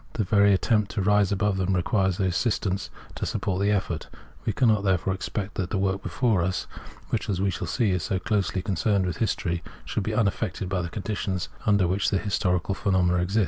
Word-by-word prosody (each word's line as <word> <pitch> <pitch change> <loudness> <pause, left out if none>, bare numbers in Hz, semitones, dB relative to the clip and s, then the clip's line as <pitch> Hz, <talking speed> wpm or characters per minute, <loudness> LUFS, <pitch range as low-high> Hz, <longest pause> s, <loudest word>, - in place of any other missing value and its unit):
The 110 - 0
very 100 +1 +4
attempt 105 +1 +2
to 100 - -1
rise 105 -1 +3
above 100 0 +1
them 95 0 +1
requires 95 +1 +1
their 95 -2 +1
assistance 95 0 -1 0.2
to - - -6
support 95 -1 -1
the 100 - +2
effort. 95 -5 -1 0.4
We - - +1
cannot, 110 -2 +3
therefore, 95 -1 +1
expect 100 +1 -4
that 90 -2 -1
the 100 - -1
work 95 0 0
before 105 +2 +1
us, 90 +2 -1 0.5
which, - - -1
as 95 -3 0
we 95 0 +1
shall 90 0 -4
see, 110 +4 +1
is 90 -2 0
so 95 - -1
closely 95 -2 -1
concerned 100 0 +1
with 90 -3 -2
history, 85 -5 -1 0.2
should - - -2
be 105 +2 -2
unaffected 100 -4 0
by 95 -1 0
the 85 - -4
conditions 95 -2 -3 0.2
imder 100 -4 +4
which 95 +3 +1
historical 95 -2 0
phenomena 90 -3 +2
exist. 95 +5 +1
95 Hz, 200 wpm, -26 LUFS, 90-105 Hz, 0.5 s, very